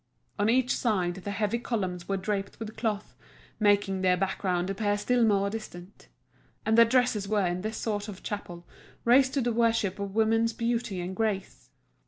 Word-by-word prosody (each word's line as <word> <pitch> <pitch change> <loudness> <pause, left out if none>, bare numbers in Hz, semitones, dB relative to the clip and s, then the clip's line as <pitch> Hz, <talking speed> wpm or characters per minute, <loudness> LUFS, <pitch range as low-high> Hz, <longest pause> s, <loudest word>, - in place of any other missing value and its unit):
On 205 +2 +2
each 250 +2 +3
side 185 -7 0
the 190 +2 -7
heavy 210 +3 -1
columns 185 -7 -3
were 195 - +1
draped 195 +1 -3
with 220 -1 -6
cloth, 215 -3 -3 0.4
making 205 -2 +2
their 180 -1 +3
background 185 -1 -1
appear 205 +1 0
still 245 +3 +2
more 200 -3 +3
distant. 200 -3 -9 0.6
And 220 - +3
the 230 0 +8
dresses 240 -4 +1
were 205 -2 +1
in 175 +1 -1
this 215 +2 -4
sort 205 -2 -2
of 200 -3 -9
chapel 175 -4 -6 0.4
raised 260 +3 +5
to 275 - +2
the 240 -1 0
worship 225 -4 +1
of 200 0 -5
woman's 225 +1 +2
beauty 230 -5 -2
and 180 +2 -5
grace. 210 -3 -3
205 Hz, 175 wpm, -28 LUFS, 190-230 Hz, 0.6 s, the